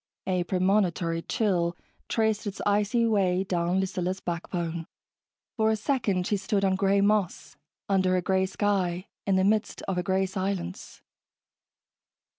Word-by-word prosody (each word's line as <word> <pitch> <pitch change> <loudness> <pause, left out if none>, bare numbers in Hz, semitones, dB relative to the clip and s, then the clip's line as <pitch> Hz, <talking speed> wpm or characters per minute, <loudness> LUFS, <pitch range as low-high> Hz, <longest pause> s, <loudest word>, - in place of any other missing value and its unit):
A 185 -1 0
premonitory 180 -3 +1
chill 175 -4 0 0.3
traced 220 -1 +1
its 200 - -5
icy 210 +3 +2
way 190 -4 +2
down 180 -1 0
Lucilla's 185 0 -2
backbone. 170 -2 -4 0.7
For 220 -1 +3
a 220 - +3
second 215 -6 0
she 205 - +1
stood 200 0 0
on 190 -1 +2
gray 195 +1 +2
moss, 205 -3 0 0.3
under 185 -2 +2
a - - +1
gray 190 0 +2
sky, 185 -3 0 0.2
in 195 - +3
the 190 - +3
midst 215 +2 +1
of 190 -2 -2
a - - -1
gray 190 +1 +1
silence. 190 -1 -4
190 Hz, 140 wpm, -27 LUFS, 180-205 Hz, 0.7 s, For